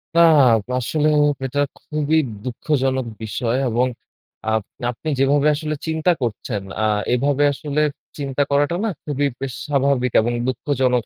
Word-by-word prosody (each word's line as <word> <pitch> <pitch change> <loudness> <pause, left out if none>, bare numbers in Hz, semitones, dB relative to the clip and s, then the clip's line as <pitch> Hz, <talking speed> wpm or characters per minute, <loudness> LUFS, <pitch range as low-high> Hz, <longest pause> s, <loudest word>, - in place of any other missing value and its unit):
নাহ, 155 -7 +6 0.3
আসলে 150 +5 0 0.4
এটা 140 +2 -2 0.2
খুবই 155 +1 -1 0.3
দুঃখজনক 130 0 -1 0.2
বিষয় 115 +3 -1
এবং 120 +3 +2 0.7
আপ 110 - +2 0.3
আপনি 155 +6 -6
যেভাবে 140 +2 +3
আসলে 155 0 -3
চিন্তা 160 +2 +2
করছেন 110 -3 -3 0.2
আ - - +1 0.3
এভাবে 140 +3 +2
আসলে 150 +2 -2 0.4
চিন্তা 140 -1 -2
করাটাও 145 +5 +2
না - - +1 0.2
খুবই 145 -1 0
বেশ 135 -2 -3
স্বাভাবিক 140 -3 +1
এবং 120 +2 -1
দুঃখজনক 130 -2 0
140 Hz, 130 wpm, -21 LUFS, 125-150 Hz, 0.7 s, নাহ